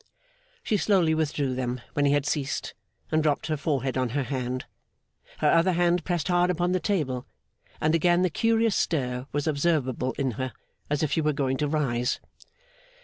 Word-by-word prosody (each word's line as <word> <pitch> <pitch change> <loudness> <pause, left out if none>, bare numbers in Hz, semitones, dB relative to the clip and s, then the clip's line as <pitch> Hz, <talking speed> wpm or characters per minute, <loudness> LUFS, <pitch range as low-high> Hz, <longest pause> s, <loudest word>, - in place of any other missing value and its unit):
She 215 - +1
slowly 185 -5 +3
withdrew 150 -4 0
them 125 -1 -2
when 145 - +1
he 140 - +4
had 145 -1 +1
ceased, 145 -3 -2 0.4
and 155 0 +3
dropped 150 -2 +1
her 155 - 0
forehead 135 -3 -1
on 130 -1 0
her 140 - +1
hand. 130 -1 -3 0.7
Her - - +3
other 170 +2 +4
hand 175 0 +2
pressed 175 -4 -1
hard 175 0 +3
upon 175 0 +1
the 185 - +2
table, 150 - -1 0.5
and 155 +1 +2
again 175 +2 +3
the 185 - +1
curious 225 +1 +2
stir 125 -4 -1
was 145 0 -1
observable 140 -5 0
in 135 -3 -1
her, 130 -2 -3 0.4
as 150 +1 0
if 150 - 0
she 160 - +2
were 150 0 +1
going 135 -2 0
to 150 - 0
rise. 130 -5 0
150 Hz, 180 wpm, -26 LUFS, 130-175 Hz, 0.7 s, he